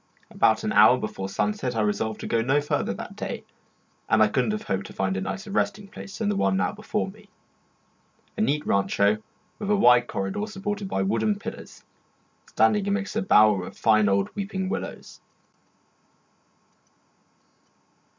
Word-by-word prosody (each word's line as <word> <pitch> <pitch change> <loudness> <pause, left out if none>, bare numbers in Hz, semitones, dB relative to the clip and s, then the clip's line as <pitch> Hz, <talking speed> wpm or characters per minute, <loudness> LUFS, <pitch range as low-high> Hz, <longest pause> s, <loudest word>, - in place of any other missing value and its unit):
About - - +2
an - - -1
hour - - +7
before 95 0 -5
sunset 105 +5 -1
I 110 - +1
resolved 105 +1 -1
to - - -5
go 115 - +1
no 135 +5 +2
farther 145 - -1
that - - -7
day; - - -5 0.7
and 110 -1 +5
I 105 - +3
could 125 +3 +1
not 105 - -1
have 105 - -4
hoped 95 0 -2
to - - -12
find 95 0 -1
a 95 - -2
nicer 195 - -5
resting 200 0 -1
place 195 -1 -9
than 220 - -2
the 205 - +1
one 195 -1 +1
now 200 - +1
before 215 0 -3
me 210 0 -19 1.1
a - - -2
neat 150 -7 +1
rancho 100 +1 +2 0.4
with 205 -2 -4
a 210 - +4
wide 125 -10 +5
corridor 95 - -3
supported 205 0 -4
by 95 - 0
wooden 110 +1 0
pillars, - - -9 0.6
standing 195 - +2
amidst 200 +1 -2
a 225 - +1
bower 105 - +4
of - - -12
fine 110 -2 +3
old 100 0 0
weeping 195 -2 -3
willows. - - -6
125 Hz, 170 wpm, -25 LUFS, -, 1.1 s, hour